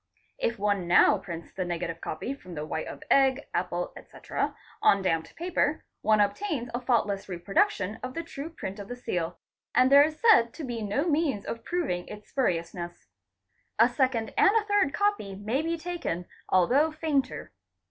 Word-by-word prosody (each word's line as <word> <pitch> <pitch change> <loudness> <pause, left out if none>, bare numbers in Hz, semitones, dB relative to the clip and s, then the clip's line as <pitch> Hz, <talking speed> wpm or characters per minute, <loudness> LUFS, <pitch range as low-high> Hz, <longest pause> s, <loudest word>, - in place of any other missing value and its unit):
If 235 - 0
one 200 -3 0
now 180 +3 +6
prints 170 -3 -8
the 185 - -2
negative 170 -1 -4
copy, 160 +12 -4
from 185 -10 -11
the 150 0 -4
white 160 +1 -3
of - - -8
egg, 270 0 +4
apple, 175 0 -2
etc., - - -4 0.3
on 200 -1 +4
damped 165 -3 -1
paper, 325 -3 0 0.2
one 215 0 +3
obtains 240 - 0
a 240 - -2
faultless 210 -6 0
reproduction 190 +2 0
of 255 0 -6
the 335 - -3
true 315 -2 -7
print 205 - -7
of 200 - -7
the 245 - -5
seal, 175 -8 -3 0.4
and 255 +1 +5
there 280 +1 +9
is 310 +1 +1
said 385 - +5
to 320 - -7
be 240 -4 -4
no 215 - 0
means 295 -10 +1
of 230 - -5
proving 320 - -2
its 210 0 -10
spuriousness. 175 -7 -2 0.7
A - - +7
second 255 -5 0
and - - +7
a 440 -1 +3
third 410 -8 +2
copy 405 - 0
may 215 +8 -1
be 335 +1 -1
taken, 330 - -4 0.2
although 260 - +4
fainter. 305 -4 -1
230 Hz, 175 wpm, -28 LUFS, 185-295 Hz, 0.7 s, there